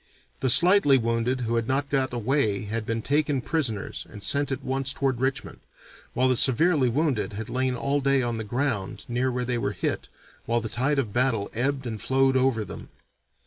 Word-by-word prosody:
The 130 - 0
slightly 175 -1 +6
wounded 115 +2 -1
who 115 0 -1
had 115 -1 -1
not 140 +1 -1
got 135 -2 +1
away 120 -4 0
had 110 +1 -4
been 115 -1 -2
taken 145 -1 +1
prisoners 125 -7 -2
and 105 -2 -9
sent 140 +7 +2
at 135 0 -3
once 135 +1 -1
toward 130 -3 -1
Richmond 130 0 -2 0.6
while 130 +1 +3
the 130 - +3
severely 135 +2 +3
wounded 130 -5 -1
had 110 +2 -6
lain 130 0 0
all 140 +3 -1
day 135 -1 +2
on 120 -1 -2
the - - -3
ground 115 -3 -3
near 125 +2 -1
where 125 0 -2
they 120 -1 -1
were 105 -2 -2
hit 90 - -3 0.4
while 120 +1 +1
the 110 -1 -5
tide 135 +6 0
of 115 -7 -1
battle 120 -5 0
ebbed 135 +3 -1
and 110 -3 -5
flowed 135 0 +2
over 130 -4 +1
them. - - -9
130 Hz, 195 wpm, -25 LUFS, 115-135 Hz, 0.6 s, slightly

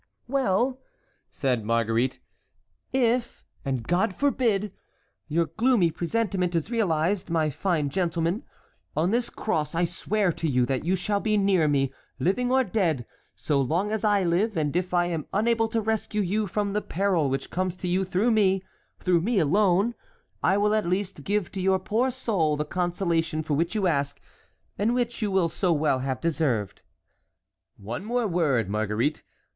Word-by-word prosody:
"Well!" 255 0 +1 0.5
said 125 -5 -1
Marguerite, 115 +3 0 0.7
"if—and 235 - -1
God 180 +2 +1
forbid!—your 205 - -1
gloomy 225 -8 +3
presentiment 180 0 -1
is 165 +7 -1
realized, 185 -4 0
my 160 -2 +1
fine 155 -3 -1
gentleman, 170 - 0 0.6
on 170 +5 +2
this 240 +1 0
cross 155 -8 -2
I 175 +1 +2
swear 195 +3 0
to 165 - -3
you 125 -2 +2
that 130 0 -1
you 180 +4 +1
shall 200 +3 -1
be 215 0 +1
near 195 -5 +3
me, 135 -2 +1 0.2
living 195 - 0
or 260 0 +4
dead, 175 - 0 0.3
so 145 -3 0
long 170 +10 0
as 220 -2 -2
I 205 -2 +3
live; 185 +5 +1
and 150 -1 0
if 180 +1 0
I 175 -1 +3
am 165 -4 -3
unable 225 +2 +2
to 225 0 -1
rescue 220 -1 -1
you 205 +3 0
from 200 +2 -1
the 210 - 0
peril 180 -7 0
which 135 +1 -3
comes 185 0 -1
to 180 - -5
you 185 +2 +1
through 190 +6 +1
me, 195 -3 +3 0.3
through 180 -2 +2
me 225 +5 0
alone, 195 +6 +3 0.5
I 190 - +3
will 210 +1 +2
at 215 -4 +1
least 185 -4 -2
give 205 +1 -1
to 195 - -4
your 190 0 +3
poor 220 +7 0
soul 195 -12 0
the 150 - -1
consolation 170 -2 -1
for 155 - -2
which 170 +6 0
you 205 -3 +1
ask, 140 -5 0 0.6
and 225 +4 +2
which 240 -1 -1
you 210 - 0
will 190 -3 +2
so 175 +2 0
well 150 -4 +2
have 130 -1 -2
deserved." 135 - -1 1.0
"One 120 - -6
word 240 -4 0
more, 150 -9 +2
Marguerite. 105 +7 -1
180 Hz, 165 wpm, -26 LUFS, 155-210 Hz, 1.0 s, or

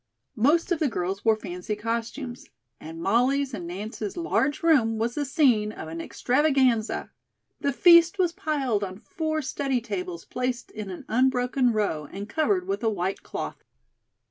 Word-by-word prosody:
Most 315 - +3
of 340 - +2
the 310 - +2
girls 195 -3 -3
wore 225 -1 +4
fancy 180 0 -5
costumes, 235 +4 -4 0.3
and 165 +1 -8
Molly's 260 +6 +2
and 180 -6 -5
Nance's 205 - -5
large 315 -4 0
room 245 -9 +4
was 230 +2 -1
the 290 +2 -2
scene 250 -8 +3
of 160 - -8
an 165 +1 -5
extravaganza. 255 - +1 0.5
The 280 - 0
feast 340 +6 +6
was 360 -3 +2
piled 290 - -1
on 190 -1 -5
four 315 - -3
study 270 -1 -1
tables 185 -7 -5
placed 250 -1 -3
in 215 -2 -6
an 180 - -8
unbroken 250 +1 +2
row 180 -9 -1
and 200 +1 -6
covered 360 - +1
with 390 +1 -2
a 225 - +3
white 190 -2 -2
cloth. - - -6
240 Hz, 160 wpm, -26 LUFS, 210-290 Hz, 0.5 s, feast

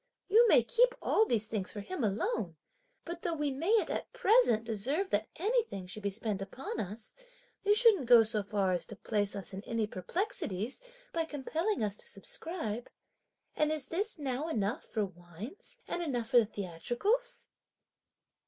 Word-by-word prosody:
You 455 +4 +6
may - - +7
keep - - +3
all 440 - +3
these 220 -2 +2
things 215 -3 -1
for 205 - -5
him 295 - -4
alone! 200 -3 -1 0.5
but 340 0 -5
though 340 -2 -1
we 295 -2 0
mayn't 355 +12 +2
at - - -3
present, 440 - +4
deserve 260 - -1
that 210 +2 +1
anything 425 - 0
should 185 +4 -8
be 200 - 0
spent 205 0 -3
upon 235 +6 -5
us, 215 +2 -5 0.5
you 415 +1 +5
shouldn't 425 - +6
go 235 -2 +9
so 215 -1 -1
far 200 -2 0
as 175 -2 -1
to 215 - -7
place 205 0 -1
us 200 0 -6
in 190 - -5
any 230 -2 0
perplexities 215 - -3 0.3
(by 330 -1 0
compelling 320 - -1
us 205 -1 -1
to - - -5
subscribe). 240 - -4 0.7
And 305 0 +2
is 305 -4 -3
this 405 +5 -1
now 280 0 -2
enough 215 -7 -1
for 215 -3 -1
wines, 185 - -11
and 350 - -2
enough 245 -8 -2
for - - +6
the 220 - +2
theatricals?" 240 - -1
240 Hz, 170 wpm, -32 LUFS, -, 0.7 s, go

